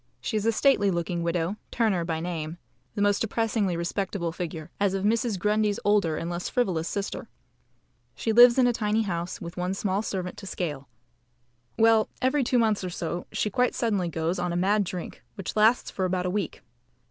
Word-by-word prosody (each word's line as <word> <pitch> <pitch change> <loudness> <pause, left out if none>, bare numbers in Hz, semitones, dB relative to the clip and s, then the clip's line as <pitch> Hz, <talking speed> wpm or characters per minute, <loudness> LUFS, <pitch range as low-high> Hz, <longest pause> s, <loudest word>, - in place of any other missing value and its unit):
She 220 - -3
is 215 +1 0
a - - +5
stately 225 -4 +3
looking 170 -1 -1
widow, 170 +3 -1
Turner 215 -7 +1
by 165 -1 -2
name, 165 -1 -4 0.4
the 205 - +1
most 205 0 +3
depressingly 220 -4 0
respectable 175 0 -2
figure, 165 -2 -6
as 200 -1 +2
of 195 +1 -1
Mrs. 225 -1 +1
Grundy's 210 +1 +1
older 200 -7 +3
and 165 - -3
less 175 0 -3
frivolous 180 -9 0
sister. 200 0 -4 0.9
She 225 - -1
lives 240 +2 +8
in 255 - +5
a 245 - +3
tiny 220 -1 +1
house, 175 -3 -3
with 170 +1 -8
one 180 +2 -1
small 195 0 0
servant 185 -4 -4
to 195 - -9
scale. 145 -8 -4 0.9
Well, 225 -1 +4
every 260 +2 +2
two 250 +1 +1
months 220 -4 +2
or 185 - -2
so 175 0 -4
she 210 - -1
quite 250 +4 +1
suddenly 205 -7 0
goes 165 +2 -1
on 175 0 -1
a - - -2
mad 200 +3 +2
drink, 180 -1 -6
which 195 - -5
lasts 220 +3 +3
for 190 - -1
about 180 0 -1
a 180 - 0
week. 195 -9 -3
195 Hz, 195 wpm, -26 LUFS, 175-215 Hz, 0.9 s, lives